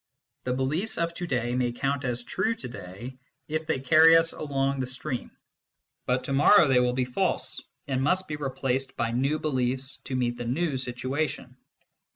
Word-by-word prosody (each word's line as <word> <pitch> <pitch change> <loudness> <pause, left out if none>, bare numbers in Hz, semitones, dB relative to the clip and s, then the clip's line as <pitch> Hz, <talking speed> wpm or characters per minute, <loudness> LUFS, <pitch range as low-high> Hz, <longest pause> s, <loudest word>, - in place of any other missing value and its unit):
The 125 - 0
beliefs 150 - 0
of 170 0 0
to 175 +1 -5
day 120 -3 -1
may 125 -1 +1
count 135 +2 -1
as 120 -1 -1
true 220 - -1
to 230 - -7
day, 120 +4 -9 0.3
if 155 +1 -3
they - - 0
carry 160 +5 +7
us 165 0 +3
along 140 -2 -1
the 130 - -1
stream; 130 0 -3 0.8
but 125 0 +1
to 135 - -2
morrow 150 +5 +6
they 130 -2 +4
will 125 0 +2
be 125 0 0
false, 125 0 -1 0.3
and 130 -2 0
must 185 +7 +1
be 150 - -3
replaced 135 -2 -2
by 115 -1 0
new 135 +6 +1
beliefs 130 -3 -1
to 130 - -3
meet 120 -1 0
the 120 - -5
new 145 +5 0
situation. 130 +1 -3
135 Hz, 185 wpm, -27 LUFS, 125-155 Hz, 0.8 s, carry